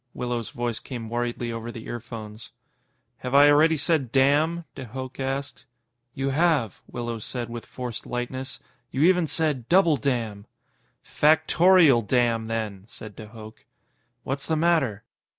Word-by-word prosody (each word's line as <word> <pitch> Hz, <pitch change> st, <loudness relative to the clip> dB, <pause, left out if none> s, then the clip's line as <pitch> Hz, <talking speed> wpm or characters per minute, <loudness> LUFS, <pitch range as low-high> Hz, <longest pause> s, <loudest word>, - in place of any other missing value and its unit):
Willows' 120 Hz, -2 st, -3 dB
voice 120 Hz, -2 st, -3 dB
came 120 Hz, -4 st, -7 dB
worriedly 120 Hz, 0 st, -2 dB
over 115 Hz, +1 st, -5 dB
the 115 Hz, -1 st, -9 dB
earphones. 115 Hz, -2 st, -8 dB, 0.7 s
"Have 125 Hz, +2 st, -3 dB
I 145 Hz, +1 st, +8 dB
already 160 Hz, +2 st, +4 dB
said 145 Hz, -5 st, 0 dB
'damn'?" 150 Hz, +6 st, +2 dB
de 130 Hz, -, -8 dB
Hooch 130 Hz, +3 st, -7 dB
asked. 135 Hz, +1 st, -4 dB, 0.5 s
"You 135 Hz, +1 st, -1 dB
have," 145 Hz, -, +1 dB
Willows 120 Hz, -2 st, -5 dB
said 120 Hz, -2 st, -5 dB
with 120 Hz, -1 st, -7 dB
forced 125 Hz, -3 st, -6 dB
lightness. 130 Hz, +2 st, -4 dB, 0.3 s
"You 135 Hz, -, 0 dB
even 180 Hz, -1 st, +4 dB
said 150 Hz, -7 st, -1 dB
'double 170 Hz, -4 st, +5 dB
damn'." 115 Hz, -7 st, -2 dB, 0.6 s
"Factorial 160 Hz, -2 st, +5 dB
damn, 115 Hz, -1 st, +1 dB
then!" 110 Hz, -4 st, -4 dB
said 110 Hz, -3 st, -10 dB
de 110 Hz, -, -9 dB
Hooch. 110 Hz, 0 st, -13 dB, 0.6 s
"What's 135 Hz, +1 st, -4 dB
the 160 Hz, -, +1 dB
matter?" 155 Hz, -10 st, +1 dB
125 Hz, 140 wpm, -25 LUFS, 115-145 Hz, 0.7 s, I